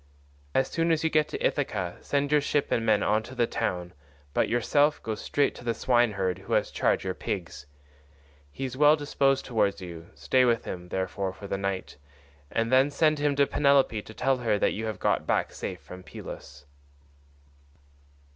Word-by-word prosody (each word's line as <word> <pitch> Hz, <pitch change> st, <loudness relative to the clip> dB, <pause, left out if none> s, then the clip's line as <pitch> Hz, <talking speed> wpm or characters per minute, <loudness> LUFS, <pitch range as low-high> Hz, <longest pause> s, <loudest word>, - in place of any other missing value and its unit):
As 135 Hz, -, +3 dB
soon 165 Hz, 0 st, 0 dB
as 160 Hz, -1 st, +1 dB
you 160 Hz, -, +1 dB
get 155 Hz, -1 st, +3 dB
to -, -, -3 dB
Ithaca 95 Hz, -11 st, -1 dB
send 140 Hz, 0 st, -1 dB
your 150 Hz, -1 st, +4 dB
ship 145 Hz, 0 st, 0 dB
and 115 Hz, -, +1 dB
men 110 Hz, -2 st, +3 dB
on 110 Hz, +1 st, +2 dB
to 130 Hz, +4 st, -11 dB
the 120 Hz, -2 st, +2 dB
town, 90 Hz, -7 st, -3 dB, 0.4 s
but -, -, +1 dB
yourself 145 Hz, +5 st, +2 dB
go 110 Hz, -, -2 dB
straight 140 Hz, +6 st, 0 dB
to -, -, -12 dB
the 115 Hz, -1 st, -1 dB
swineherd 105 Hz, -7 st, +1 dB
who -, -, -5 dB
has -, -, +1 dB
charge -, -, +1 dB
of -, -, -10 dB
your 95 Hz, -, -1 dB
pigs; 85 Hz, -7 st, -5 dB, 0.8 s
he 135 Hz, -, -5 dB
is 130 Hz, -1 st, -5 dB
well 150 Hz, +2 st, +6 dB
disposed 140 Hz, -2 st, +1 dB
towards 110 Hz, -5 st, +1 dB
you, 85 Hz, -2 st, -9 dB
stay 130 Hz, -1 st, +2 dB
with 120 Hz, -2 st, +2 dB
him, 90 Hz, -1 st, -6 dB
therefore, 95 Hz, +1 st, -2 dB
for 100 Hz, -, -11 dB
the 100 Hz, -, -2 dB
night, 100 Hz, -5 st, -3 dB, 0.5 s
and 115 Hz, +1 st, 0 dB
then 130 Hz, +2 st, +5 dB
send 155 Hz, +1 st, +2 dB
him 145 Hz, -1 st, +1 dB
to 140 Hz, 0 st, +4 dB
Penelope 140 Hz, -7 st, +3 dB
to 110 Hz, -, -12 dB
tell 135 Hz, 0 st, +1 dB
her 115 Hz, -4 st, +1 dB
that -, -, +1 dB
you 110 Hz, +1 st, -3 dB
have 110 Hz, -3 st, -4 dB
got -, -, 0 dB
back -, -, 0 dB
safe -, -, -5 dB
from 90 Hz, 0 st, -11 dB
Pylos." 75 Hz, -5 st, -10 dB
115 Hz, 195 wpm, -27 LUFS, 95-140 Hz, 0.8 s, well